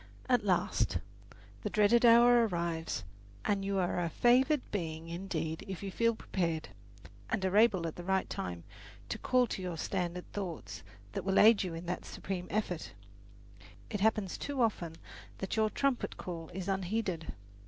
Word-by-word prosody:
At 245 -4 +3
last 170 - +1 0.6
the - - -2
dreaded 215 +3 +4
hour 235 0 +7
arrives, 170 - -2 0.4
and 200 -1 +1
you 195 0 -1
are 180 -1 +1
a 170 -1 0
favoured 255 - +4
being 165 -4 -3
indeed 165 -2 -3
if 190 0 -6
you 195 - -4
feel 230 +3 +2
prepared, 165 -7 -2 0.6
and 190 - 0
are 190 +1 0
able 210 -5 +5
at 165 - -4
the 175 - -6
right 190 +1 +1
time 85 -2 -5 0.5
to - - -3
call 255 -1 +3
to 205 - -4
your 180 -2 -4
standard 180 0 -2
thoughts 185 -6 -5 0.3
that - - -4
will 195 0 +1
aid 220 0 +7
you 180 -3 -3
in 165 +2 -7
that 180 +1 -3
supreme 180 -2 -5
effort. 185 -6 -2 1.0
It 205 - -2
happens 210 -2 +1
too 280 -4 0
often 175 -7 -1 0.4
that 195 - -3
your 220 -1 +3
trumpet 275 +2 -1
call 165 -3 -6
is 185 0 -5
unheeded. 190 -3 -2
190 Hz, 165 wpm, -32 LUFS, 170-215 Hz, 1.0 s, hour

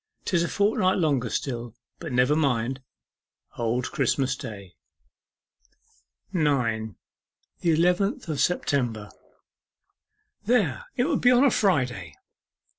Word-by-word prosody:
''Tis 175 -3 +1
a - - -1
fortnight 200 -1 +1
longer 140 -9 +1
still; 120 -3 -4 0.2
but - - -6
never 125 +4 +3
mind. 135 -3 0 0.7
Old 120 +2 -1
Christmas 135 -3 0
Day.' 100 -7 -9 1.6
9. 115 - 0 0.6
THE 170 - 0
ELEVENTH 180 - +1
OF 155 -3 -3
SEPTEMBER 120 - 0 1.3
'There. 205 - +1
It 245 - +3
will 295 0 +1
be 245 - +4
on 250 +1 +5
a 280 - +5
Friday! 125 - 0
140 Hz, 110 wpm, -25 LUFS, 120-180 Hz, 1.6 s, on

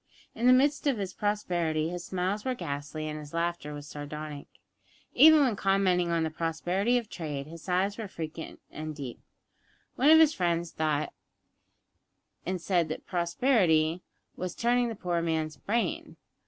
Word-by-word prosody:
In 235 +2 0
the - - +8
midst 285 +4 +3
of 270 -4 +2
his 195 -2 -4
prosperity 175 -7 -1
his 175 0 -5
smiles 190 +3 -2
were 255 -1 -1
ghastly 145 - -5
and 155 0 -4
his 150 +1 -9
laughter 170 -3 -2
was 145 0 -8
sardonic. 150 0 -7 0.7
Even 315 0 +8
when 255 -6 +2
commenting 195 -3 +2
on 165 -1 +1
the 160 - -1
prosperity 175 +8 0
of 235 -3 -3
trade 150 -7 -5
his 165 +2 -10
sighs 195 +3 0
were 220 - -4
frequent 160 -3 -7
and 155 0 -6
deep. 135 -5 -7 0.8
One 275 +4 +4
of 320 - +9
his 315 -1 +6
friends 170 -2 0
thought 155 -1 -1 1.3
and 185 0 -1
said 175 -2 +1
that 155 - -5
prosperity 170 - +2 0.3
was 180 -1 -4
turning 240 +1 +2
the 225 - -5
poor 175 -3 -1
man's 160 -2 -1
brain. 235 - -2
175 Hz, 160 wpm, -29 LUFS, 155-210 Hz, 1.3 s, of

